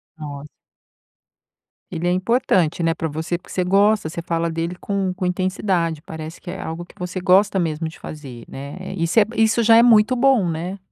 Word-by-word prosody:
Nos 145 -2 -8 1.4
Ele 170 +1 -3
é - - +2
importante, 185 -4 +1
né, 165 0 +2
pra 165 -1 -3
você. 160 +3 -3
Porque - - -17
você 185 - 0
gosta, 200 -1 +3
você 170 - -5
fala 170 -1 -1
dele 165 +2 -3
com 195 -2 -2
com 185 0 -4
intensidade, 180 -3 -1
parece 160 -1 -8
que 175 - -7
é 190 - -7
algo 165 +2 -5
que - - -20
você 180 +1 -4
gosta 195 +1 +4
mesmo 160 -1 -1
de 160 - -10
fazer, 135 -6 -9
né. 140 +2 -8 0.2
Isso 165 +6 +2
é 215 - +7
isso 225 +1 +3
já 225 0 +7
é 235 - +7
muito 230 +1 +5
bom, 250 -6 +3
né. 175 +5 -4
175 Hz, 190 wpm, -21 LUFS, 160-195 Hz, 1.4 s, é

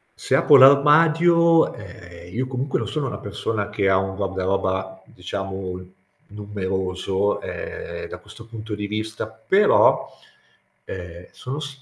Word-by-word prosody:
se - - -1
apro 145 - +5
l'armadio, 165 +5 +5
ehm, 90 -4 -12
io 130 +1 -1
comunque 130 +1 -2
non - - -4
sono 150 -3 -3
una 125 - -5
persona 105 0 -4
che 100 -2 0
ha 95 - +4
un 95 0 -2
guardaroba, 95 -1 -2
diciamo, 95 0 -6 0.5
numeroso, 95 -1 -2
ehm, - - -7
da - - -8
questo 115 - -14
punto 110 -2 -7
di 105 0 -4
vista, 110 +1 -4
però, 110 - +3 0.8
ehm, 90 -1 -9
sono 135 +3 -6
s 145 -3 -8
105 Hz, 130 wpm, -22 LUFS, 95-130 Hz, 0.8 s, apro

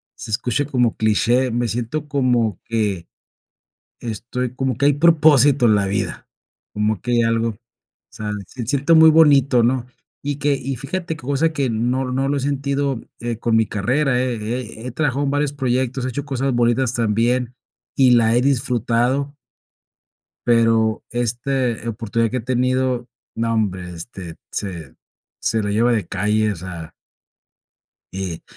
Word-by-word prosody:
se 110 - -8
escuche 125 +5 0
como 125 -5 +1
cliché, 120 +4 +2
me 120 +1 0
siento 120 +7 -3
como 125 - +1
que 105 -7 -2 0.9
estoy 120 +2 -4
como 130 -2 -2
que 140 - +1
hay 145 - +5
propósito 145 -4 +5
en 110 - +5
la 100 -1 +1
vida. 100 - -3 0.5
Como 105 -1 0
que 125 - -6
hay 120 - +3
algo, 115 0 +1
o 105 - -8 0.5
sea, 105 -1 -5 0.2
se 120 -3 -7
siente 140 +4 +2
muy 160 0 +8
bonito, 140 -6 +5
¿no? 125 +1 +1 0.4
Y 145 0 -2
que 145 0 +1
y 135 0 -3
fíjate 160 +6 -4
qué - - -13
cosa 140 +5 0
que 140 -4 0
no 125 +3 -1
no 135 +2 0
lo 145 - 0
he - - -1
sentido, 140 -1 -1 0.2
eh, 120 -1 -3
con 115 -1 +1
mi 110 - +4
carrera, 125 +6 0
he 125 -2 -1
he 115 +1 -5
he - - -5
trabajado 145 0 -1
en 140 - 0
varios 145 0 0
proyectos, 130 -1 -1
he - - -1
hecho 140 +3 -4
cosas 135 -2 -1
bonitas 120 +1 +2
también, 120 +2 0 0.4
y 130 -2 +5
la 115 -1 +4
he 120 - +3
disfrutado. 130 +1 0 1.1
Pero 115 -2 +2
este 120 0 -1
oportunidad 115 0 -1
que 130 - -1
he - - -3
tenido, 125 0 0 0.3
nombre, 110 -6 -1
este, 85 -1 -8
se 85 -9 -5 0.5
se 110 - 0
lo 105 - -2
lleva 115 +4 +2
de 105 -6 -1
calle, 105 +3 0
o - - -7
sea 85 -2 -8 1.2
Y 95 -4 -4
120 Hz, 160 wpm, -20 LUFS, 110-135 Hz, 1.2 s, muy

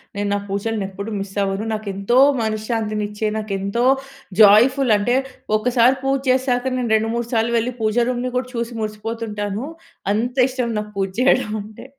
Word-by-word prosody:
నేను 205 0 -2
నా 205 - +2
పూజలని 205 +2 -2
ఎప్పుడు 200 +2 -6
మిస్ 195 0 -7
అవ్వను. 195 +2 -2
నాకు 215 -1 -5
ఎంతో 200 +6 0 0.2
మనశ్శాంతినిచ్చే, 215 -1 -2
నాకు 215 -2 -4
ఎంతో 200 +5 -1 0.6
జాయ్‌ఫుల్ 240 +5 +6
అంటే, 240 +5 +1 0.4
ఒకసారి 245 +3 +3
పూజ 270 0 +2
చేసాక. 255 -1 +2
నేను 240 -3 -1
రెండు 220 +1 +1
మూడు 235 0 -2
సార్లు 230 +1 +1
వెళ్ళి, 235 +2 -1
పూజ 215 0 0
రూమ్‌ని 250 0 -2
కూడా 255 0 -2
చూసి 235 0 -3
మురిసిపోతుంటాను. 215 0 -4 0.5
అంతిష్టం 250 +2 0
నాకు 210 0 -6
పూజ 195 -1 0
చేయడమంటే. 215 -5 0
220 Hz, 150 wpm, -20 LUFS, 210-245 Hz, 0.6 s, జాయ్‌ఫుల్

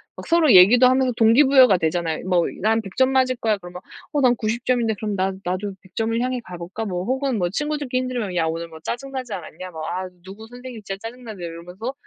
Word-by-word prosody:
막 - - -10
서로 330 -5 +4
얘기도 205 +8 +8
하면서 260 0 +2
동기부여가 250 -1 +6
되잖아요. 165 -1 -1
뭐 175 -2 +3 0.2
“난 220 +3 +2
100 195 -4 -11
점 260 0 +3
맞을 260 -1 +2
거야.” 220 -3 0
그러면 180 -1 -10 0.3
“어, 295 -2 0
난 250 -2 +4
90 230 +2 -3
점인데.” 240 -3 +1
그럼 210 0 -4
“나 190 0 0
나도 185 +3 -3
100 190 - -22
점을 225 0 0
향해 255 0 -1
가 180 - -9
볼까?” 180 +6 -6
뭐 180 -3 -3
혹은 265 +2 -1
뭐 175 -1 0
친구들끼리 290 +2 -2
힘들면 240 -7 -3
“야, 165 -2 +1
오늘 165 +1 -3
뭐 160 -1 -12
짜증 255 +11 -5
나지 255 -4 -5
않았냐? 180 0 -8
뭐, 160 -2 -8
아, 185 +1 -3 0.2
누구 200 +4 -11
선생님 245 -1 -10
진짜 195 -1 -5
짜증 240 +3 -8
나네.” 215 -6 -8
이러면서 180 +8 -6
220 Hz, 425 characters per minute, -22 LUFS, 180-255 Hz, 0.3 s, 얘기도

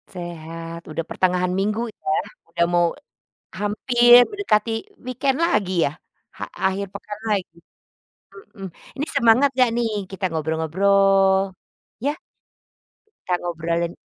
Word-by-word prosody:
Sehat. 165 -1 -7
Udah 165 +1 -3
pertengahan 180 -1 +1
minggu 210 +3 0 0.2
ya, 385 - -1 0.4
udah 170 - +3
mau 175 0 +4 0.7
hampir 240 +3 +5
mendekati 230 - +1 0.3
weekend 265 +2 0
lagi 200 - +1
yah? 145 +3 -3 0.4
Ha - - -5 0.2
akhir 190 +1 0
pekan 210 +1 -8
lagi. 190 -5 -1 1.0
Mhm. 195 -1 -7 0.3
Ini 285 - -2
semangat 250 +1 +5
enggak 255 -2 +3
nih? 230 -2 0 0.2
Kita 195 0 -9
ngobrol-ngobrol. 190 +5 +2 0.5
Iya? 285 +4 +1 1.0
Kita 430 - -12
ngobralin 170 0 -2
195 Hz, 110 wpm, -22 LUFS, 170-235 Hz, 1.0 s, hampir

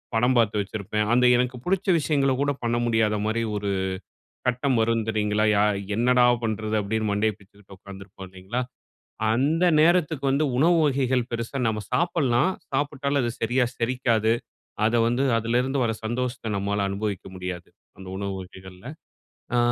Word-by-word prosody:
படம் 125 +3 +3
பாத்து 110 -2 +2
வைச்சிருப்பேன். 105 +1 -3
அந்த 125 +1 +4
எனக்கு 125 +1 0
பிடிச்ச 190 +2 0
விஷயங்கள 140 -3 +1
கூட 145 0 +2
பண்ண 120 0 0
முடியாத 110 -2 +2
மாரி 110 +2 0
1 100 0 -2 0.8
கட்டம் 125 +1 +1
வரும் 115 0 +1
தெரியுங்களா, 105 -1 0
"ய - - +3 0.4
என்னடா 125 +2 +3 0.2
பண்றது?" 110 0 -2
அப்டீன்னு 110 +1 -1
மண்டைய 105 +1 +1
பிச்சுக்கிட்டு 100 0 -17
உக்காந்திருப்போம் 95 0 -11
இல்லைங்களா! 95 +7 -4 0.7
அந்த 145 +9 +1 0.2
நேரத்துக்கு 160 -4 +2
வந்து 140 +3 +2
உணவு 170 +5 +4
வகைகள் 130 -3 +1
பெரிசா 115 +3 -4
நம்ம 110 -1 -2
சாப்பிடலாம். 150 -4 +2 0.2
சாப்பிட்டாலும் 145 -1 0
அது 120 - -1
சரியா 125 +3 +2
செரிக்காது. 115 -2 +1 0.5
அதை 120 +1 +2
வந்து 120 +3 +1 0.2
அதிலிருந்து 125 +4 0
வர 115 - 0
சந்தோஷத்தை 120 +1 -3
நம்மால 100 +1 -1
அனுபவிக்க 100 -1 -3
முடியாது, 90 -1 -6 0.3
அந்த 95 - -11
உணவு 100 0 -3
வகைகள்ல. 95 +3 -13 0.7
அ - - +3
115 Hz, 145 wpm, -25 LUFS, 105-130 Hz, 0.8 s, அந்த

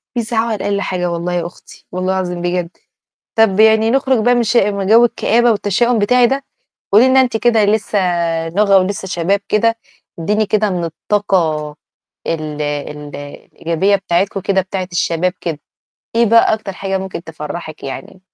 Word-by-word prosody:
بيزعقوا 230 0 -1
علي - - 0
أقل 200 0 0
حاجة 180 -2 -2
والله 170 +1 -3
يا 175 -1 -1
أختي 175 - -13
والله 185 +1 -1
العظيم 180 -2 -3
بجد، 175 -1 -1 0.7
طَب 220 -3 +3
يعني 220 0 +5
نخرج 265 -1 +2
بقى 245 0 +4
من 240 - +2
ش 230 +2 0
من 200 -2 +1
جو 230 +3 +6
الكآبة 240 0 +2
والتشاؤم 225 +3 +1
بتاعي 245 +4 +4
ده، 270 +2 -2 0.5
قُولي 225 +6 +6
لنا 265 0 +5
أنتِ 245 -3 0
كده 230 -2 +3
لسه 210 0 0 0.5
نوغة 200 +2 +3
ولِسّه 190 +1 -1
شباب 185 +3 0
كده، 230 +2 +2 0.4
إدّيني 210 +5 0
كده 210 0 +1
من 175 -2 -2
الطاقة 165 -3 -1 0.6
ال 155 -2 -3
ال 145 0 -5
الإيجابية 165 +6 -2
بتاعتكم 195 +1 -1
كده 195 0 +1
بتاعة 185 0 -5
الشباب 175 +1 0
كده، 160 -3 -4 0.6
إيه 235 0 +4
بقى 230 0 +5
أكتر 215 -3 -7
حاجة 195 0 -3
ممكن 190 -2 -6
تفرّحِك 155 0 -8
يعني؟ 135 +7 -8
195 Hz, 165 wpm, -16 LUFS, 175-220 Hz, 0.7 s, جو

